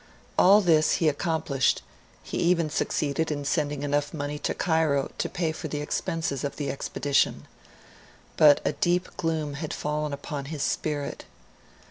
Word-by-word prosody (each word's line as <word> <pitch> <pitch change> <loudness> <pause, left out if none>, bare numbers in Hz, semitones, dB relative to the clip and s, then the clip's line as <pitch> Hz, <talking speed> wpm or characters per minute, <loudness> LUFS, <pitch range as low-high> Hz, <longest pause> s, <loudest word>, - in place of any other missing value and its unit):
All 200 +3 +7
this 160 -4 +4
he 165 - +2
accomplished; 150 -3 +1 0.4
he - - -4
even 170 -3 +2
succeeded 155 0 0
in 145 -2 -3
sending 145 -1 -1
enough 145 +1 -1
money 145 0 -4
to - - -2
Cairo 160 -5 +1
to - - -1
pay 170 -4 -1
for 160 +1 -6
the 150 0 -3
expenses 160 -2 -2
of 140 - -3
the 145 -2 -2
expedition. 140 0 0 0.9
But 150 -2 +6
a - - +2
deep 175 +4 0
gloom 160 -3 -1
had 150 +2 -4
fallen 150 0 -2
upon 140 0 -5
his 145 0 -4
spirit. 145 -2 -2
150 Hz, 150 wpm, -26 LUFS, 145-160 Hz, 0.9 s, All